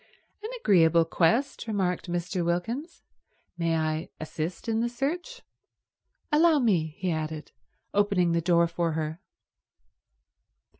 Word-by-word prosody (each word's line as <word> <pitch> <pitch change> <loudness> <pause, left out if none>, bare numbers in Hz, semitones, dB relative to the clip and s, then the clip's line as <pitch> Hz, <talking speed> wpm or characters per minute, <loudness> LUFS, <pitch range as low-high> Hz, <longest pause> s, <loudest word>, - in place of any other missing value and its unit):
"An 430 - -5
agreeable 170 - +4
quest," 225 +12 +1
remarked 185 -5 -1
Mr. 175 +1 -2
Wilkins, 225 - -3 0.5
"May 165 -1 0
I 155 +1 -1
assist 160 +5 -5
in 225 -1 +1
the 240 +1 0
search? 340 - -4 0.9
Allow 315 +1 +5
me—" 175 - +1
he 185 -3 -1
added, 155 -1 -4 0.4
opening 200 -4 +2
the 170 0 +1
door 170 0 +4
for 170 -1 -1
her. 160 +2 -3
175 Hz, 115 wpm, -27 LUFS, 165-230 Hz, 0.9 s, Allow